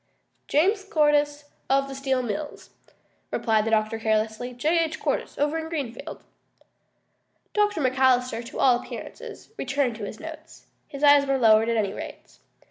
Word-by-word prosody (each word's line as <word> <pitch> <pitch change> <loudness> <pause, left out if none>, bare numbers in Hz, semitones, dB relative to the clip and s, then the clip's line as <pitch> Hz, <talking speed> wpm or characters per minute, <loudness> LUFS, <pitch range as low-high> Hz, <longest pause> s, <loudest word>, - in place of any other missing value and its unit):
"James 390 +7 +2
Cordyce, 295 -5 +1 0.2
of 275 0 +3
the 275 - -7
Steel 265 -1 -1
Mills," 270 +6 -5 0.6
replied 220 -2 +1
the - - 0
doctor 220 0 +1
carelessly. 220 +2 -1
"J. 305 +8 +1
H. 320 0 -6
Cordyce - - -2
over 295 +3 0
in 320 0 -6
Greenfield." 285 -1 -5 1.3
Dr. 415 -5 +1
McAllister, 255 -2 +2
to - - -9
all 250 -3 +4
appearances, - - -9
returned 270 -3 -1
to 210 - -5
his 215 - -8
notes. 320 0 -10 0.2
His 280 +1 -8
eyes 285 -1 +6
were 275 0 +2
lowered, 225 -2 +5
at 230 - +1
any 200 -2 0
rate. - - -10
270 Hz, 150 wpm, -25 LUFS, 230-295 Hz, 1.3 s, eyes